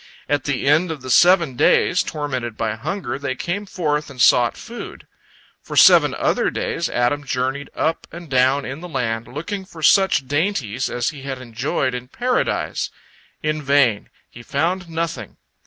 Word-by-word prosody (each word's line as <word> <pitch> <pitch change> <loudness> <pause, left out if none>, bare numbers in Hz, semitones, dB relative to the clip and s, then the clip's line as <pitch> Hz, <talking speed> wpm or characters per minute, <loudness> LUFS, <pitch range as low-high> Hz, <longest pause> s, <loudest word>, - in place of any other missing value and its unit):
At 145 -1 0
the 140 -3 -1
end 155 +5 +3
of 155 -5 -6
the 130 - -4
seven 175 -3 +5
days, 180 +7 +3
tormented 130 -7 -4
by 110 -2 -1
hunger, 140 - -4
they 140 -2 -3
came 200 +8 -4
forth 150 -5 -2
and 135 -2 -12
sought - - +4
food. - - -9 0.6
For - - -8
seven - - +7
other - - +1
days, - - -2
Adam 125 +4 0
journeyed 135 +1 -2
up 165 +1 -1
and 175 0 -9
down 130 +1 +2
in 135 +3 -6
the 180 - -8
land, 115 -6 -2
looking 170 +9 -5
for 165 -4 -12
such 190 -6 +4
dainties 140 - -1
as 120 -1 -1
he 145 -4 -9
had 135 -1 -5
enjoyed 130 +2 -2
in 125 0 -5
Paradise. 250 - -1 0.5
In 155 0 -1
vain; 140 -7 +2 0.2
he 120 - -13
found 170 +8 -2
nothing. 165 -9 -4
140 Hz, 165 wpm, -21 LUFS, 130-165 Hz, 0.6 s, seven